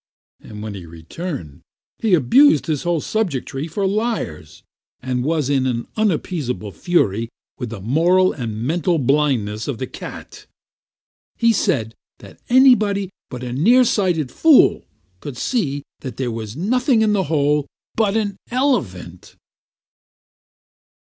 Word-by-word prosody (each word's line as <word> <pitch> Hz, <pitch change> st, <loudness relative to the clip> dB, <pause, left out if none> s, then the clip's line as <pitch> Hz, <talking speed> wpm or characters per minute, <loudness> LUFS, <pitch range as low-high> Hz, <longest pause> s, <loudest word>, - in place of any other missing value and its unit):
When 105 Hz, 0 st, -8 dB
he 90 Hz, -4 st, -9 dB
returned, 85 Hz, -, -7 dB, 0.4 s
he 215 Hz, -5 st, +3 dB
abused 265 Hz, -, +5 dB
his 155 Hz, -4 st, -1 dB
whole 175 Hz, -3 st, 0 dB
subjectry 160 Hz, -, -3 dB
for 195 Hz, +5 st, -2 dB
liars, 195 Hz, -, -3 dB, 0.4 s
and 125 Hz, -1 st, -2 dB
was 155 Hz, -1 st, 0 dB
in 135 Hz, -2 st, +1 dB
an 120 Hz, -2 st, -2 dB
unappeasable 155 Hz, -, -1 dB
fury 115 Hz, -, 0 dB, 0.3 s
with 125 Hz, -3 st, -4 dB
the 110 Hz, -2 st, -7 dB
moral 170 Hz, -, +3 dB
and 115 Hz, -4 st, -5 dB
mental 170 Hz, +5 st, 0 dB
blindness 130 Hz, -7 st, 0 dB
of 140 Hz, -5 st, -3 dB
the 130 Hz, -, -3 dB
cat. -, -, -10 dB, 0.9 s
He 230 Hz, -1 st, +3 dB
said 115 Hz, -, 0 dB, 0.2 s
that -, -, -15 dB
anybody 215 Hz, -7 st, +4 dB, 0.2 s
but 125 Hz, -1 st, -7 dB
a 125 Hz, -1 st, -4 dB
near 230 Hz, -, +5 dB
sighted 180 Hz, -, 0 dB
fool 320 Hz, -4 st, +4 dB, 0.3 s
could 135 Hz, +2 st, -8 dB
see 145 Hz, -, -1 dB, 0.2 s
that 130 Hz, -5 st, -8 dB
there 125 Hz, -3 st, -2 dB
was 110 Hz, +1 st, -6 dB
nothing 245 Hz, -, +2 dB
in 215 Hz, -1 st, +2 dB
the 195 Hz, -2 st, +1 dB
hole 150 Hz, -2 st, +1 dB, 0.3 s
but 220 Hz, -1 st, +1 dB
an 205 Hz, -3 st, -2 dB
elephant. 115 Hz, -, -2 dB
150 Hz, 130 wpm, -20 LUFS, 120-200 Hz, 0.9 s, abused